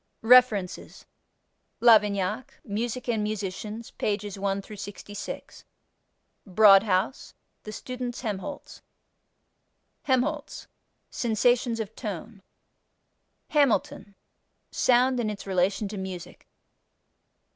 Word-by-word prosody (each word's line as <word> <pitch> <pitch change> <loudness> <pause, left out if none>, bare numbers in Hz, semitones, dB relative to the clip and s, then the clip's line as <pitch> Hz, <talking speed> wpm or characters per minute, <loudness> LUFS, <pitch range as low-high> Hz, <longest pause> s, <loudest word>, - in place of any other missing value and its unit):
REFERENCES 225 -6 +3 0.7
Lavignac 210 -1 +3
Music 235 +4 -4
and 225 -3 0
Musicians, 210 +2 -5
pp. 205 -1 -2
1 195 0 -2
66. 205 - -8 0.8
Broadhouse 195 +2 +4 0.3
The 215 - -8
Student's 250 +2 -6
Helmholz. 220 +6 -6 1.2
Helmholtz 280 +3 -1 0.5
Sensations 235 +1 +1
of 220 0 -5
Tone. 210 -1 -7 1.1
Hamilton 215 -7 +1 0.6
Sound 250 +1 +3
and 225 -3 0
its 210 -1 -6
Relation 190 +2 0
to 205 -1 -6
Music. 185 -2 -8
215 Hz, 80 wpm, -26 LUFS, 200-245 Hz, 1.2 s, Broadhouse